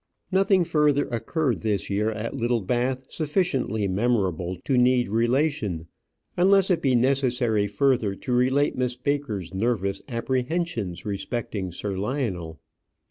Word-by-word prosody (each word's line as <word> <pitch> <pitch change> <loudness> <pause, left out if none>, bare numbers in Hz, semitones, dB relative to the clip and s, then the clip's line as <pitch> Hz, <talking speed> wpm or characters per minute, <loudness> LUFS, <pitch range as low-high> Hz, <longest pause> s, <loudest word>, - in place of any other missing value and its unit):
Nothing 190 -1 +4
further 150 -4 +2
occurred 125 +3 -1
this 105 -3 -1
year 105 +2 +1
at 110 +1 -4
Littlebath 125 +2 -1
sufficiently 145 - 0
memorable 95 -4 0
to 135 - +1
need 125 0 +3
relation, 115 - 0 0.5
unless 195 +1 +4
it 170 -2 +2
be 130 -3 +2
necessary 120 -4 +2
further 110 -1 +1
to 125 - -4
relate 130 +4 +2
Miss 125 -1 -1
Baker's 125 - -2
nervous 100 -2 -1
apprehensions 125 - -2
respecting 100 -2 -3
Sir 100 +3 -4
Lionel. 95 - -3
120 Hz, 120 wpm, -25 LUFS, 105-140 Hz, 0.5 s, Nothing